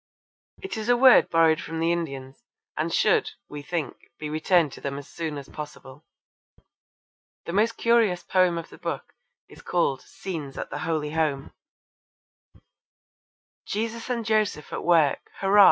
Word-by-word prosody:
It 385 - -4
is 220 +2 -4
a 245 - +5
word 255 0 +7
borrowed 165 -1 +4
from 165 0 -5
the 165 +1 +2
Indians, 135 - -4 0.3
and - - -1
should, 440 -1 +3 0.2
we 150 0 -7
think, 165 0 -5
be 150 -1 -5
returned 155 0 +2
to - - -11
them 140 0 -3
as 140 - -8
soon 160 -3 -5
as 140 -1 -8
possible. 150 -1 -10 1.4
The 170 - -5
most 220 +3 +2
curious 225 -7 +3
poem 185 -2 +2
of 165 - -6
the - - -14
book - - -5 0.3
is - - -15
called 140 -7 0
Scenes 155 -8 -7
at - - -5
the 145 - -4
Holy 155 -3 -2
Home: 150 -4 -1 2.1
Jesus 230 +3 -3
and 235 -2 -2
Joseph 215 -8 0
at - - -4
work! 165 -5 +3
Hurra! 195 +1 +4
165 Hz, 155 wpm, -25 LUFS, 150-205 Hz, 2.1 s, word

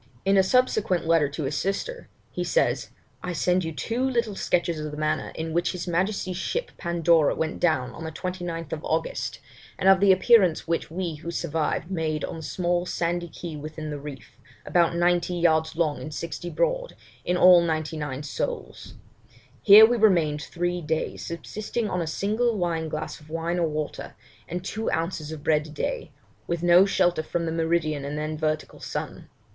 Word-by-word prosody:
In 195 +1 +4
a 195 - +7
subsequent 205 -4 +2
letter 165 -3 +3
to 150 +2 -5
his 140 +2 -2
sister 200 - -3 0.2
he - - -3
says, - - +1 0.3
'I 180 - -4
send 180 +5 +1
you 160 - -3
two 230 - -2
little 235 -5 0
sketches 170 -3 0
of 150 0 -4
the 150 - -8
manner 155 0 -1
in 160 0 -4
which 175 +2 +1
his 180 0 -5
Majesty's 185 +1 -1
ship 480 - -3
Pandora 170 -2 +2
went 160 0 -2
down 155 -8 +1
on 165 - -9
the 160 - -5
29th 170 -2 -4
August, 160 +1 -2 0.4
and 190 - 0
of 195 -1 +7
the 200 0 +6
appearance 190 -4 +4
which 165 0 -1
we 170 0 -3
who 170 +3 -7
survived 165 +1 -2
made 160 -4 -1
on - - -4
the - - -7
small 175 +2 -1
sandy 175 0 -1
key 165 -1 -7
within 155 +1 -6
the 145 - -4
reef, 140 -4 -10 0.3
about 170 -1 +2
ninety 175 +1 +2
yards 160 -2 +2
long 155 -3 0
and 155 - -7
sixty 170 +1 -5
broad, - - -1 0.3
in 180 - 0
all 180 -1 +8
ninety 160 -2 -1
nine 145 -2 -4
souls; 480 - -5 0.7
here 215 +1 +10
we 240 +2 +1
remained 170 -9 +3
three 175 +2 -2
days, 160 0 -2
subsisting 215 +7 -4
on 180 -3 -1
a 165 - -3
single 215 +7 0
wine 165 -3 -1
glass 155 0 -5
of 150 0 -18
wine 165 +2 -2
or 170 - +2
water, 150 -1 -5 0.3
and 180 +2 -5
two 220 +2 -2
ounces 165 -2 -2
of 155 -2 -7
bread 155 -1 +2
a - - -12
day, 460 - -3 0.4
with 170 0 -2
no 175 +2 +6
shelter 175 -4 +2
from 170 +2 -3
the 160 - -2
meridian 160 -3 0
and 145 +1 -4
then 155 +1 -3
vertical 155 0 -2
sun. - - -6
170 Hz, 185 wpm, -25 LUFS, 155-185 Hz, 0.7 s, here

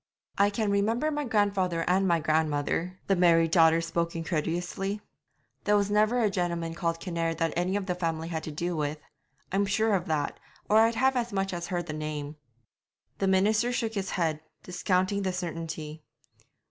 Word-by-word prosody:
'I 200 +1 +5
can 205 0 -1
remember 225 +9 +1
my 295 -1 -2
grandfather 200 -7 +1
and 190 +2 +3
my 170 -2 +3
grandmother 155 +3 0
the 195 - +2
married 165 -2 +4
daughter 165 -1 +5
spoke 170 0 -2
incredulously 175 +5 -2 0.6
'there 210 0 +3
was 200 0 0
never 215 +4 +3
a 215 - +3
gentleman 170 -3 -2
called 165 0 -2
Kinnaird 165 -2 -2
that 165 0 0
any 180 +3 0
of 205 -1 -1
the 180 - -1
family 165 -2 -2
had 160 -2 -3
to 155 - -5
do 170 +4 -2
with. 150 0 -2 0.5
I'm 200 +1 +1
sure 220 +2 +2
of 185 -1 0
that, 150 -3 -1 0.3
or 215 - +4
I'd 225 +1 +4
have 265 +3 +3
as 240 -1 -1
much 195 -1 -1
as 175 0 -4
heard 175 -3 -2
the 155 - -5
name.' 150 -1 -5 0.8
The 195 - +1
minister 215 +5 +3
shook 230 -2 -1
his 195 -2 -3
head, 160 -3 0 0.2
discounting 185 +2 0
the 190 -1 0
certainty. 165 -3 -5
180 Hz, 180 wpm, -28 LUFS, 165-200 Hz, 0.8 s, I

